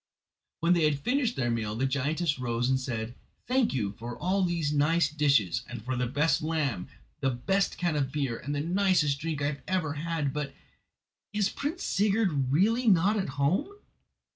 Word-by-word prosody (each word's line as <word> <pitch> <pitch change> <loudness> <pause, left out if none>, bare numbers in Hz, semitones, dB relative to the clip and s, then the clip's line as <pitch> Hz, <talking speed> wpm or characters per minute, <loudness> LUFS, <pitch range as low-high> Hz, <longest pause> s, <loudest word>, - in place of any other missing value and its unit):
When 170 +2 +4
they 170 -3 +3
had 150 -2 +2
finished 245 - 0
their 120 -2 0
meal 110 -2 -2
the 130 +4 0
giantess 145 +3 0
rose 120 0 0
and 130 - +2
said: 120 -3 -4 0.3
"Thank 255 -1 +2
you 110 -7 -1
for 120 +1 -6
all 190 +2 0
these 170 -4 0
nice 150 +2 +3
dishes, 140 - +2
and 120 -2 -7
for 130 0 -1
the 125 0 0
best 150 +6 +1
lamb, 150 - -1 0.3
the 135 - +1
best 190 +11 0
can 175 -3 0
of 135 -3 0
beer 135 -6 -2
and 145 +1 -4
the 145 - -1
nicest 175 -4 +2
drink 155 -2 -3
I - - +2
have 145 -1 -2
ever 180 -6 0
had; 155 -2 -2
but—is 150 +7 -6
Prince 310 +5 -4
Sigurd 195 - +1
really 225 - +2
not 195 +1 +4
at 195 -7 -1
home?" 175 - +1
150 Hz, 180 wpm, -28 LUFS, 130-185 Hz, 0.3 s, When